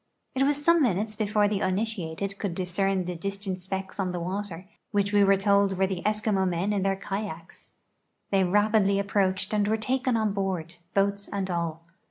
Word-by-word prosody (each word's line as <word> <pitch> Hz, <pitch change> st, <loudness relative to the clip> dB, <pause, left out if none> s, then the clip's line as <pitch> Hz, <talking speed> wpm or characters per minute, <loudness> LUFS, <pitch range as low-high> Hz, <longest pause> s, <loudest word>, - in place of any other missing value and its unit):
It 265 Hz, -, -1 dB
was 290 Hz, +1 st, +1 dB
some 335 Hz, -1 st, +5 dB
minutes 215 Hz, -3 st, +1 dB
before 210 Hz, -1 st, +2 dB
the 205 Hz, -1 st, -1 dB
uninitiated 195 Hz, -1 st, -2 dB
could 195 Hz, -5 st, -2 dB
discern 185 Hz, +1 st, 0 dB
the 180 Hz, 0 st, -4 dB
dis 195 Hz, +4 st, -3 dB
tant 190 Hz, -2 st, -4 dB
specks 190 Hz, +2 st, -5 dB
on 185 Hz, -2 st, 0 dB
the 175 Hz, -, -2 dB
water, 185 Hz, 0 st, -4 dB, 0.2 s
which 200 Hz, -1 st, +1 dB
W(! 205 Hz, -1 st, +5 dB
were 195 Hz, 0 st, +5 dB
told 200 Hz, -1 st, +3 dB
were 190 Hz, -, +3 dB
the 190 Hz, -2 st, -3 dB
Eskimo 210 Hz, -3 st, +1 dB
men 180 Hz, +4 st, 0 dB
in 200 Hz, -, 0 dB
their 195 Hz, 0 st, +1 dB
kayaks. 195 Hz, -3 st, -6 dB, 0.6 s
They 195 Hz, -1 st, +4 dB
rai)idly 200 Hz, +1 st, +3 dB
approiicbcd 195 Hz, -1 st, 0 dB
and 205 Hz, -1 st, +2 dB
were 220 Hz, +1 st, +2 dB
taken' 255 Hz, +2 st, 0 dB
on 215 Hz, -2 st, +1 dB
lioard 185 Hz, -4 st, -3 dB
— 170 Hz, -, -40 dB
l)oats 200 Hz, 0 st, +1 dB
and 195 Hz, -2 st, -2 dB
all. 165 Hz, -1 st, -2 dB
195 Hz, 195 wpm, -27 LUFS, 185-210 Hz, 0.6 s, some